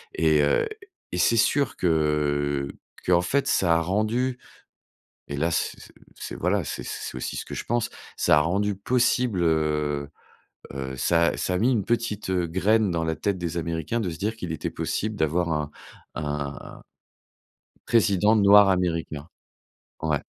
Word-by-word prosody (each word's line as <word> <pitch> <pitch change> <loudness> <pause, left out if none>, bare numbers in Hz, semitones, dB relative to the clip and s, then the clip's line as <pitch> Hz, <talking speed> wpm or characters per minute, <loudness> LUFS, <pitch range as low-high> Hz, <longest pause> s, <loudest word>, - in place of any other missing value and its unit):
Et 80 -2 +3
heu, 70 - +2 0.4
et 90 - -3
c'est 115 +6 +3
sûr, 140 +4 +2
que 75 -4 +1 0.4
qu'en 90 -1 +4
fait 140 +10 0
ça 85 -3 +3
a - - +1
rendu, 110 +8 0 0.9
et 70 - -4
là, 80 +4 0
c' 80 - -1
c' - - -14 0.3
c' - - -6
voilà, 90 +1 +1
c'est - - -5
c'est - - -5
aussi 65 - -4
ce - - -4
que - - -6
je - - -5
pense, 120 -1 -1 0.3
ça 75 - +4
a - - +3
rendu 100 +6 0
possible, 120 -2 +1
heu 75 -3 0 0.7
heu, 65 -1 -5
ça 85 +5 +3
a - - -1
ça 90 - -1
a - - +1
mis 125 +4 +3
une 110 -6 0
petite, 110 -4 -1
heu, 90 -2 0
graine 105 +5 +2
dans 85 -1 -1
la 80 0 -1
tête 100 +2 -1
des 85 -1 -4
Américains 85 +6 -2
de 100 -6 -1
se 80 - -6
dire 105 +4 -2
qu'il 90 -7 -6
était 80 - -3
possible 110 +1 -2
d'avoir 85 0 0
un 75 -1 -2 0.5
un 75 -1 -5 1.1
président 105 -1 +3
noir 100 -1 +7
américain. 85 -5 -1 0.7
Ouais. 80 -3 0
85 Hz, 170 wpm, -25 LUFS, 75-105 Hz, 1.1 s, noir